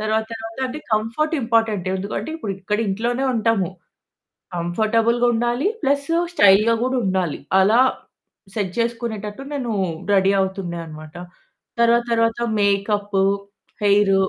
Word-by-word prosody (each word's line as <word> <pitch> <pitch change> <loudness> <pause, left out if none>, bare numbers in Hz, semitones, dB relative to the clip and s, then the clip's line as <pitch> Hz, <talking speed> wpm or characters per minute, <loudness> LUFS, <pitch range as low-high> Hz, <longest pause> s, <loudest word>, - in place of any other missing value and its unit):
తర్వాత 220 +1 0
తర్వాత 225 +1 -7
అంటే 265 +4 -6
కంఫర్ట్ 230 +10 0
ఇంపార్టెంట్, 225 -5 +1
ఎందుకంటే 200 +10 -4
ఇప్పుడు 210 -11 -4
ఇక్కడ 210 +2 -1
ఇంట్లోనే 240 +6 -1
ఉంటాము. 220 -5 +1 0.9
కంఫర్టబుల్‌గా 225 +7 +1
ఉండాలి. 240 - 0
ప్లస్ 280 0 +1 0.3
స్టైల్‌గా 205 - +5
గూడా 260 0 0
ఉండాలి. 185 -5 -1 0.2
అలా 210 +5 +4 0.8
సెట్ 200 -4 -1
జేసుకునేటట్టు 230 -2 -3
నేను 255 -5 -2 0.4
రెడీ 195 0 +4
అవుతుండే 190 -2 -2
అనమాట. 155 +1 -11 0.6
తర్వాత 235 0 +4
తర్వాత 230 0 +1 0.2
మేకప్పు, 200 0 +1 0.6
హెయిర్ 200 -1 +4
215 Hz, 115 wpm, -21 LUFS, 195-235 Hz, 0.9 s, స్టైల్‌గా